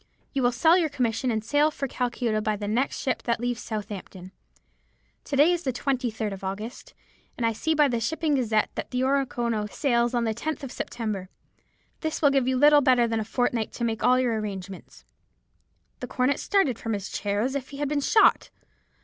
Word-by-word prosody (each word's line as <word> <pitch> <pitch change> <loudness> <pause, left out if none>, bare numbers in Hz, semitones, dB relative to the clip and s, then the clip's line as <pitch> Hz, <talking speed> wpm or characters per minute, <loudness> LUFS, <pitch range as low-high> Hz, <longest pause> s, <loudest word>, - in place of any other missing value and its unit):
You 275 - 0
will 245 -1 +3
sell 320 +9 +4
your 325 -3 +1
commission, 250 -3 -1
and 220 -2 -1
sail 290 +5 +3
for 280 -2 -4
Calcutta 240 -3 -1
by 215 0 0
the 205 0 -5
next 240 +6 0
ship 260 - -1
that 235 -1 -1
leaves 245 -1 -2
Southampton. 200 -4 -7 0.9
To 280 - -3
day 295 +5 +5
is 350 -1 0
the 270 - -1
23rd 240 -5 -2
of 195 - -9
August, 205 +5 -6 0.4
and 235 - -1
I 225 - +2
see 315 +9 -1
by 295 -1 +5
the 240 -3 -1
Shipping 310 +6 -1
Gazette 220 -5 +1
that - - -5
the 250 0 -1
Oronoko 240 -5 0
sails 240 -4 +1
on 240 - +1
the 225 -1 0
10th 305 +6 -4
of 265 - -6
September. 210 -6 -4 0.7
This 315 -1 -3
will 285 -3 +4
give 270 -2 +2
you 260 0 +1
little 295 +2 +6
better 250 -3 +4
than 225 -1 -1
a - - -1
fortnight 230 0 -1
to 235 - -5
make 225 -2 -1
all 255 0 +5
your 235 -4 +1
arrangements." 195 -3 -7 0.9
"The - - -5
young - - -14
cornet 260 +2 +2
started 345 - +1
from 225 -1 -3
his 200 0 -4
chair 205 0 -1
as 260 +4 -1
if 275 -2 -4
he 280 - -9
had 290 0 -1
been 290 0 0
shot. 430 +9 +4
245 Hz, 210 wpm, -26 LUFS, 220-275 Hz, 0.9 s, little